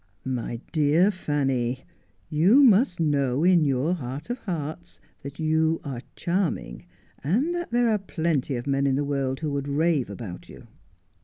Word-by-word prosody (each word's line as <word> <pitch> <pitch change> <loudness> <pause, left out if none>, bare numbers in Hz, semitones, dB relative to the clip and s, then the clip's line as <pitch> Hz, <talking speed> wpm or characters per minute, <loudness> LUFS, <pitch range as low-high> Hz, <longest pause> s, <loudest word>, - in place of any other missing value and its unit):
' - - -40 0.2
My 115 0 -5
dear 155 +6 +3
Fanny, 135 - -1 0.5
you 190 - +5
must 225 -5 +4
know, 140 -3 +1
in 175 -2 +5
your 140 +4 +1
heart 145 - -5
of 245 - -4
hearts, 170 -3 -6 0.2
that 140 +2 -9
you 160 +1 +1
are 130 -4 -5
charming, 170 - -2 0.4
and 240 - +1
that 345 0 -4
there 240 0 +2
are 215 -2 +2
plenty 160 -7 -1
of 120 - -4
men 140 0 +1
in 135 - +2
the 145 +1 0
world 135 -1 -2
who 155 -2 -2
would 140 0 -3
rave 150 -2 +1
about 100 -3 -8
you - - -12
150 Hz, 165 wpm, -25 LUFS, 135-175 Hz, 0.5 s, you